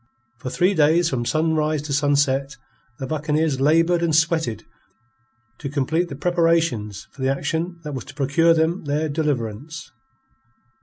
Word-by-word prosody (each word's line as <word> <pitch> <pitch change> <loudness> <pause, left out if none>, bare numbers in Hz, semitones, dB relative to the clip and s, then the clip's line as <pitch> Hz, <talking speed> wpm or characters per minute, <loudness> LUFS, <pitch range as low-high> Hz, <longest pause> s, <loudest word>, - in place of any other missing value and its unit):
For 125 - -5
three 180 +8 +2
days 165 +1 +3
from 120 -3 -1
sunrise 155 -1 0
to 150 -2 -4
sunset, 140 -1 +1 0.4
the 135 - -5
buccaneers 150 -1 -1
laboured 165 +4 +3
and 165 -2 +1
sweated 160 -7 +1 1.0
to 140 - -5
complete 155 +5 0
the 140 - -6
preparations 165 - 0
for 135 - -13
the 130 - +1
action 165 +5 -2
that 150 -1 -6
was 130 - -5
to 145 - -12
procure 155 +4 +3
them 160 +2 0
their 150 +2 0
deliverance. 145 0 -3
150 Hz, 145 wpm, -22 LUFS, 135-165 Hz, 1.0 s, days